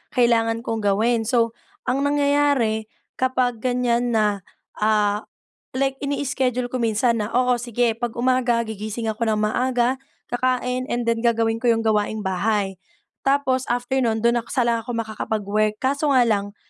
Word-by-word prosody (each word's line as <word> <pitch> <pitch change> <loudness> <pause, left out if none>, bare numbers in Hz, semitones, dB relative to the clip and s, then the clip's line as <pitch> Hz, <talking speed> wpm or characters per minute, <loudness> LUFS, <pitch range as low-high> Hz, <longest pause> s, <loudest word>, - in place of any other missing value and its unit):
kailangan 230 -2 +2
kong 225 -1 -2
gawin. 225 +4 +2
So 230 -1 +2 0.4
ang 265 +2 +1
nangyayari 285 -6 +2 0.3
kapag 255 -2 +1
ganiyan 245 -1 +1
na, 210 -2 +1 0.4
ah, 210 -1 +1 0.5
like 270 0 0
ini-schedule 265 -3 -1
ko 255 - -3
minsan 230 0 +1
na, 210 - -4
oo, 250 0 +3
sige. 240 -1 0
Pag 240 -1 -3
umaga, 245 -1 +2
gigising 220 0 -4
ako 220 +2 -2
ng 220 -1 +1
maaga, 245 +3 +1 0.3
kakain 250 0 0
and 240 -1 -1
then 230 0 0
gagawin 225 -1 +2
ko 240 - -2
'yong 225 - -1
gawaing 215 0 +1
bahay. 195 0 -1 0.5
Tapos 270 -2 +2
after 245 +2 -1
no'n, 225 -3 0
do'n 235 0 +3
saka 255 - -1
lang 235 -1 +2
ako 245 - -6
makakapag-work. 215 -1 -1
Kaso 280 +3 0
nga 255 -2 +5
lang, 205 -2 -1
235 Hz, 150 wpm, -22 LUFS, 220-255 Hz, 0.5 s, nga